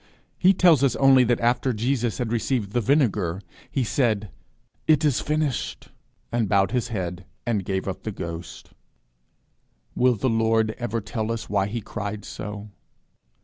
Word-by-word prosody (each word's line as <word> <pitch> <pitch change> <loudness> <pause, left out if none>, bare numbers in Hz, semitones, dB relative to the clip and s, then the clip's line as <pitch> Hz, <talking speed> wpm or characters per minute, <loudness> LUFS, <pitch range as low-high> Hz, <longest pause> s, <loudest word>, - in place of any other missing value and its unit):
He 185 - +6
tells 170 -7 +5
us 135 - +3
only 135 -1 +6
that 120 0 +1
after 125 +2 +2
Jesus 120 0 -1
had 120 -3 -2
received 115 -3 -1
the 120 - +1
vinegar, 105 - +1 0.3
he 135 - 0
said, 110 -5 0 0.6
"It 155 -1 +4
is 145 -5 +2
finished," 150 -3 -2 0.4
and 115 -4 0
bowed 95 -1 +3
his 125 -1 0
head, 95 -5 -4 0.2
and 110 -5 0
gave 95 +1 -2
up 95 - -4
the 110 - -4
ghost. 85 -3 -7 1.2
Will 125 -1 +3
the 110 +5 -1
Lord 115 -1 +2
ever 115 -1 -2
tell 110 +1 -3
us 115 -2 -5
why 100 -1 +2
he 115 +3 -4
cried 105 0 -5
so? 105 0 -7
115 Hz, 155 wpm, -24 LUFS, 100-125 Hz, 1.2 s, He